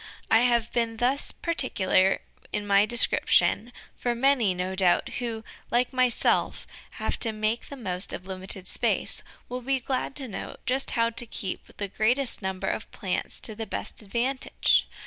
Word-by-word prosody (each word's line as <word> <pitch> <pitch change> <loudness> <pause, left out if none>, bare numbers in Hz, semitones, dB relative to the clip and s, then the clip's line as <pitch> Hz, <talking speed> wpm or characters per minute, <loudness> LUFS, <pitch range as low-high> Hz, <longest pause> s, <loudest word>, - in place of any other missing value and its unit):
I 225 - +7
have 235 -1 +2
been 230 -1 0
thus 255 +4 +1
particular 195 - +1 0.3
in 210 -1 -2
my 200 +1 +4
description, 240 0 +3 0.2
for 240 -1 -1
many, 240 -6 +3
no 180 +1 -2
doubt, 185 -2 +3
who, 230 -3 -4 0.3
like 245 +2 +1
myself, 255 -2 +2 0.3
have - - -2
to 225 - +4
make 215 +2 -2
the 280 - -8
most 185 -6 -2
of 185 - -6
limited 190 0 -4
space, - - +1 0.3
will 250 +1 -5
be 265 +2 0
glad 260 +2 -2
to 270 -3 -4
know 210 - -6
just 265 +1 0
how 230 0 +3
to 240 +1 -4
keep 190 -4 -5
the 200 - -3
greatest 235 +6 +1
number 190 -1 -3
of - - -3
plants - - -3
to 220 - -1
the 220 +1 -6
best - - -4
advantage. 240 +6 +1
230 Hz, 165 wpm, -27 LUFS, 200-250 Hz, 0.3 s, I